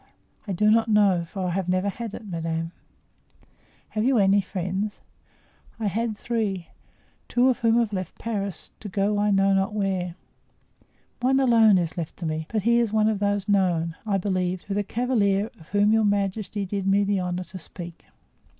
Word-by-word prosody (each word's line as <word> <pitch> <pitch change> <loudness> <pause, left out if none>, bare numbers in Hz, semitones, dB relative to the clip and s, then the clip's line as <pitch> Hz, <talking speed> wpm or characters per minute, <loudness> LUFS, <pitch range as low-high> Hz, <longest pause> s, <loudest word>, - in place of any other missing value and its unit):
"I - - -2
do 210 +4 +3
not 225 +1 +4
know, 200 -5 +3
for 190 +2 -5
I - - 0
have 185 0 -2
never 185 +2 +1
had 225 +2 -6
it, - - -9
madame." 165 -2 -3 1.2
"Have 215 - -1
you 260 +1 +3
any 200 0 +4
friends?" 190 +2 -3 0.8
"I 220 - -2
had 215 +2 -1
three, 205 -7 -2 0.6
two 250 +2 +3
of 255 - 0
whom 230 0 +3
have 230 -3 +1
left 185 -3 -4
Paris, 200 -6 -4
to 210 - -7
go 205 +2 0
I 210 0 +2
know 195 0 +3
not 195 +2 +1
where. 190 -4 -1 1.0
One 260 +2 +3
alone 225 -6 +5
is 170 -2 -2
left 160 - -5
to 175 - -5
me, 155 0 -3
but 215 -3 -1
he 235 +2 +4
is 230 -3 +1
one 215 0 +3
of 215 -2 -1
those 205 -1 0
known, 175 -5 +1
I 205 -3 0
believe, 185 -2 -1
to 205 - -3
the 205 - +1
cavalier 210 -3 +1
of 160 - -17
whom 205 +1 +3
your 220 0 +4
majesty 200 0 -1
did 195 0 -3
me 200 +1 +4
the 200 -1 +1
honor 180 0 -2
to 185 +1 -10
speak." 170 0 -10
200 Hz, 185 wpm, -25 LUFS, 185-215 Hz, 1.2 s, alone